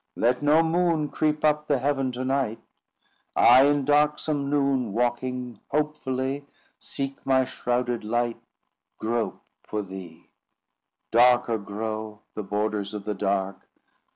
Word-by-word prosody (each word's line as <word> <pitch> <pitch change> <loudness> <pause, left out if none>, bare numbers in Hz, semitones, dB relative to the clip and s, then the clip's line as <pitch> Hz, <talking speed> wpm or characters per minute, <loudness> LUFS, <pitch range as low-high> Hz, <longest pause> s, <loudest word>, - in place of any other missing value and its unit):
"Let 125 +3 +1
no 150 +3 +5
moon 165 -2 +1
Creep 150 +1 0
up 150 0 +2
the 145 - +3
heaven 135 0 0
to 130 +1 -3
night; 130 -4 0 0.8
I 125 +3 +7
in 145 -1 +2
darksome 150 0 +2
noon 135 -6 +1
Walking 125 +1 -2
hopefully, 140 -2 -2 0.3
Seek 135 0 -5
my 130 -1 +3
shrouded 120 -2 -2
light— 120 +2 -1 0.6
Grope 115 +1 -2 0.2
for 105 -1 -4
thee! 95 -4 -10 0.8
"Darker 120 -1 +4
grow 110 +1 -5
The 110 - -4
borders 105 0 -2
of 100 -1 -6
the 105 - -1
dark! 95 -1 -2
125 Hz, 125 wpm, -26 LUFS, 110-145 Hz, 0.8 s, I